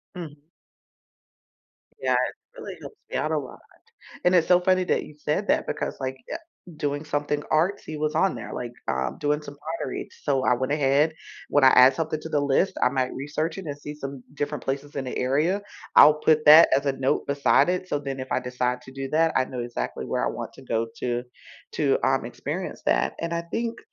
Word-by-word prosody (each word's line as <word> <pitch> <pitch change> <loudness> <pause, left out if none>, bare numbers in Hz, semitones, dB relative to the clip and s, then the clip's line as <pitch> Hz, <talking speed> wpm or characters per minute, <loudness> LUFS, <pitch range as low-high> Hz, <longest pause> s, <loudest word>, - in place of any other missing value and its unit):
Mm. 155 -5 -8 1.6
Yeah. 130 -1 +2
It 125 0 -3
really - - -7
helps - - -10
me - - -2
out 155 - -1
a 155 - +1
lot. 135 -4 -6 0.7
And 180 - +4
it's 175 -3 +4
so 180 0 +6
funny 185 0 +2
that - - 0
you 150 - -13
said 150 +7 -1
that - - +2
because, - - -3
like, 130 0 -3 0.2
uh, - - -1 0.4
doing 145 0 -2
something 145 0 -1
artsy 155 -1 0
was 155 0 -1
on 195 - +2
there, - - -7
like, 120 -1 -5 0.2
um, 65 -1 -1
doing 150 +1 0
some 145 -1 -10 0.2
pottery. - - -4 0.2
So, 135 -3 +1
I - - +4
went 130 +3 -1
ahead, 145 +2 +2 0.3
when 145 -2 +3
I - - +10
add 130 +1 +7
something 155 +1 -2
to 160 - -7
the 150 -2 +1
list, 145 +7 +2
I - - +6
might 130 -1 -1
research 150 +4 -3
it 195 - -7
and 145 -1 -5
see 150 0 -7
some 140 -3 -7
different 145 -1 -3
places 140 +2 -3
in 135 - -2
the 125 - -5
area. 155 +10 +1 0.3
I'll 150 +1 +9
put 155 -1 +3
that 155 +2 +9
as 140 - -1
a 140 - +3
note 135 0 0
beside 140 +4 +3
it 185 0 -2
so 145 - 0
then 135 -2 -5
if 130 - -7
I - - +1
decide 125 0 -2
to 130 - -13
do 135 0 -5
that, 160 +1 +3
I 130 - +4
know 125 - -5
exactly 120 0 -4
where - - -1
I - - +2
want - - -5
to - - -14
go 115 -3 -1
to 120 -1 -1 0.5
to, - - +2
um, - - +2
experience - - -5
that, - - +2
and 170 0 -3
I 170 - -1
think 230 +7 -3
145 Hz, 215 wpm, -25 LUFS, 130-155 Hz, 1.6 s, I